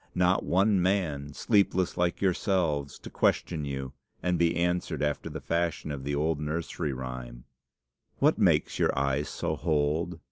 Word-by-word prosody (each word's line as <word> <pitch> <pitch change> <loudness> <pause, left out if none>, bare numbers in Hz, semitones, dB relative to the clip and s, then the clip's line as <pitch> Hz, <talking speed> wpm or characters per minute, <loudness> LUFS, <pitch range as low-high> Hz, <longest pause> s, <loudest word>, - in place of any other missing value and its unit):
Not 90 +1 +3
one 95 +1 +3
man, 85 -7 0
sleepless 95 -2 +2
like 90 -1 0
yourselves, 85 -7 0
to - - -10
question 80 -4 +1
you, 70 -1 -4 0.3
and 90 0 +1
be 85 0 +3
answered 90 -2 0
after 75 0 -1
the - - -6
fashion 85 -2 -1
of 70 -2 -5
the 70 0 -1
old 75 +1 0
nursery 75 0 -3
rhyme 65 -2 -6 0.7
"'What - - +3
makes - - +2
your - - +2
eyes 70 +1 0
so - - -2
holed? 75 +1 0
80 Hz, 150 wpm, -28 LUFS, 70-90 Hz, 0.7 s, Not